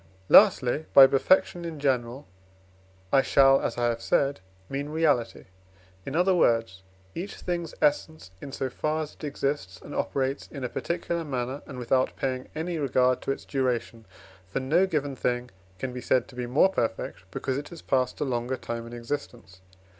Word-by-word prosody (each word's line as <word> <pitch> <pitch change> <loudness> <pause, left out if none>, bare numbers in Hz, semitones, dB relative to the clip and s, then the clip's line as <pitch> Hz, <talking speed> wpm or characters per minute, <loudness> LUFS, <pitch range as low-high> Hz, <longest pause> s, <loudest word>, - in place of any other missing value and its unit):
Lastly, 135 +5 +5
by 135 - +11
perfection 175 +6 +2
in 165 -3 -6
general 130 -1 -1 0.9
I 135 - +6
shall, 135 0 +5
as 115 - -2
I 120 - -1
have 115 -1 0
said, 140 +2 +1 0.3
mean 140 +4 -4
reality 150 -7 +1 0.6
in 135 - -4
other 180 +3 +3
words, 115 - +2 0.3
each 190 +4 -5
thing's 170 -3 -4
essence, 150 -6 0
in 140 - -7
so 135 - -2
far 155 +5 -2
as 150 - -9
it - - -18
exists, 140 - -3
and - - -10
operates 135 0 -2
in 140 -3 -8
a 125 - -2
particular 170 +2 -3
manner, 130 -1 -3
and - - -8
without 130 +1 +1
paying 130 -1 -3
any 165 +1 -3
regard 130 -2 +2
to - - -2
its - - -5
duration. 120 -4 -2 0.4
For 100 - -3
no 160 +9 +2
given 145 -6 -2
thing 125 -1 -2 0.3
can 130 +4 -4
be 125 - -6
said 125 -1 +1
to 125 - -14
be 125 -1 -4
more 140 +10 +4
perfect, 115 - -3
because 130 +8 -2
it 145 - -9
has 170 -2 -11
passed 130 -1 0
a - - 0
longer 125 0 -2
time 115 0 -5
in 120 - -10
existence. 120 -6 -6
135 Hz, 175 wpm, -27 LUFS, 120-150 Hz, 0.9 s, by